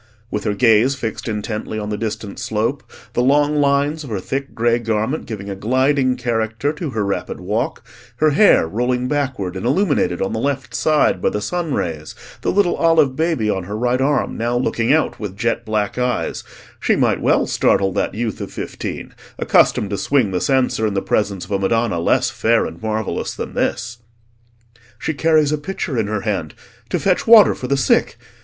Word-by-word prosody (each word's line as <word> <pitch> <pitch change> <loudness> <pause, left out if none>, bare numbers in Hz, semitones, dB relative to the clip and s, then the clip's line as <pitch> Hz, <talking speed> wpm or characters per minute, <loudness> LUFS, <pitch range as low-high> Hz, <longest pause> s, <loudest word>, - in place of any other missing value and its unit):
With 105 - -3
her 105 - 0
gaze 115 +4 +4
fixed 115 -3 -5
intently 110 0 -4
on 105 -1 -4
the 105 - -2
distant 105 -2 -5
slope, 115 +6 -2 0.2
the - - +1
long 145 +3 +3
lines 145 +2 +1
of 140 - -9
her 105 -3 -2
thick 135 +8 -4
grey 120 +1 +2
garment 115 +5 -2
giving 105 -4 -6
a 100 - -4
gliding 130 +5 +1
character 120 +2 -1
to 155 0 -5
her 110 -5 -2
rapid 100 - -3
walk, 110 +5 -3 0.3
her 155 +5 +3
hair 155 - +5
rolling 125 +6 -1
backward 130 -10 -2
and 95 - -5
illuminated 140 - +1
on 95 - -1
the 110 - -2
left 135 -1 -2
side 155 +5 +2
by - - +2
the 105 - -3
sun 165 +6 -2
rays, 80 -3 -4 0.3
the - - 0
little 195 -2 +2
olive 165 -5 +3
baby 160 -8 0
on 95 -4 -1
her 105 +3 -5
right 125 +2 0
arm 140 -1 +1
now 120 +1 -1
looking 120 -1 0
out 155 +1 +1
with 100 -3 -6
jet 115 +1 -1
black 110 +1 -1
eyes, 125 -1 -1 0.4
she - - +2
might - - +1
well - - +3
startle 95 -1 +2
that 100 - -1
youth 115 -1 -3
of - - -6
fifteen, - - -6 0.2
accustomed 100 - +2
to 100 - -2
swing 130 -8 +1
the 90 - -1
censer 130 -5 +1
in 100 - -3
the 95 - +1
presence 100 -3 -1
of - - -15
a 100 - +1
Madonna 115 -1 +1
less 125 +8 +2
fair 115 +2 +2
and 80 +1 -8
marvellous 110 -1 -3
than - - -6
this. 120 -1 -2 1.0
"She 160 - -2
carries 155 0 +3
a 150 - 0
pitcher 150 -3 -4
in 110 -3 0
her 105 -1 -2
hand—to 95 -8 -5
fetch 185 +2 +1
water 225 -2 +8
for 125 - -6
the 140 +1 +1
sick. 135 - +2
120 Hz, 190 wpm, -19 LUFS, 105-140 Hz, 1.0 s, water